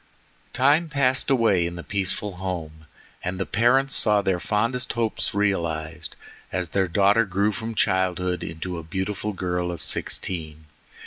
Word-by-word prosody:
Time 150 Hz, +5 st, +3 dB
passed 130 Hz, -2 st, +2 dB
away 115 Hz, -9 st, +3 dB
in 85 Hz, 0 st, -3 dB
the 85 Hz, -, -7 dB
peaceful 100 Hz, 0 st, -1 dB
home, 80 Hz, -4 st, -5 dB, 0.4 s
and 90 Hz, +1 st, -3 dB
the 95 Hz, -, 0 dB
parents 130 Hz, +5 st, +3 dB
saw 105 Hz, -2 st, +4 dB
their 95 Hz, -3 st, 0 dB
fondest 115 Hz, +6 st, 0 dB
hopes 115 Hz, -3 st, -1 dB
realized 80 Hz, -6 st, -1 dB, 0.4 s
as 90 Hz, -2 st, -2 dB
their 95 Hz, +2 st, +1 dB
daughter 100 Hz, +5 st, +4 dB
grew 100 Hz, +1 st, +1 dB
from 110 Hz, +2 st, -5 dB
childhood 90 Hz, -2 st, +1 dB
into 85 Hz, +2 st, -5 dB
a -, -, -8 dB
beautiful 95 Hz, +5 st, -3 dB
girl 90 Hz, -2 st, -2 dB
of 85 Hz, -4 st, -5 dB
sixteen. 80 Hz, -3 st, -2 dB
95 Hz, 145 wpm, -24 LUFS, 85-110 Hz, 0.4 s, saw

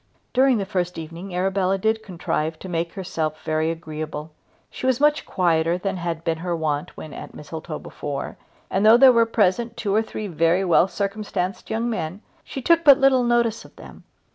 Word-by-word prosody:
During 260 Hz, -1 st, +4 dB
the 200 Hz, -, -2 dB
first 180 Hz, -2 st, -2 dB
evening 170 Hz, +3 st, -7 dB
Arabella 190 Hz, +1 st, +1 dB
did 220 Hz, +3 st, 0 dB
contrive 165 Hz, -5 st, -3 dB
to 190 Hz, -, -9 dB
make 170 Hz, -1 st, -2 dB
herself 160 Hz, -5 st, -4 dB
very 155 Hz, 0 st, 0 dB
agreeable. 155 Hz, -1 st, -6 dB, 0.4 s
She 255 Hz, -, -4 dB
was 260 Hz, -1 st, +2 dB
much 295 Hz, +1 st, +2 dB
quieter 170 Hz, -1 st, +1 dB
than 195 Hz, +1 st, -3 dB
had 170 Hz, -2 st, -4 dB
been 165 Hz, -1 st, -1 dB
her 175 Hz, 0 st, -2 dB
wont 150 Hz, -2 st, -2 dB
when 155 Hz, -, -8 dB
at -, -, -9 dB
Mistletoe 160 Hz, +1 st, -7 dB
before, 145 Hz, -1 st, -6 dB, 0.4 s
and 190 Hz, -, +1 dB
though 220 Hz, +2 st, +8 dB
there 265 Hz, +1 st, +8 dB
were 230 Hz, -1 st, +4 dB
present 225 Hz, +2 st, +1 dB
two 205 Hz, -4 st, -1 dB
or 215 Hz, -, +4 dB
three 215 Hz, -1 st, -6 dB
very 170 Hz, +1 st, +1 dB
well 175 Hz, 0 st, +4 dB
circumstanced 200 Hz, -2 st, -3 dB
young 225 Hz, +2 st, -1 dB
men 185 Hz, -3 st, -4 dB, 0.2 s
she 270 Hz, -, -7 dB
took 335 Hz, +2 st, +4 dB
but 280 Hz, -4 st, +8 dB
little 270 Hz, -2 st, +4 dB
notice 235 Hz, -2 st, +1 dB
of -, -, -17 dB
them. -, -, -13 dB
185 Hz, 190 wpm, -23 LUFS, 165-220 Hz, 0.4 s, though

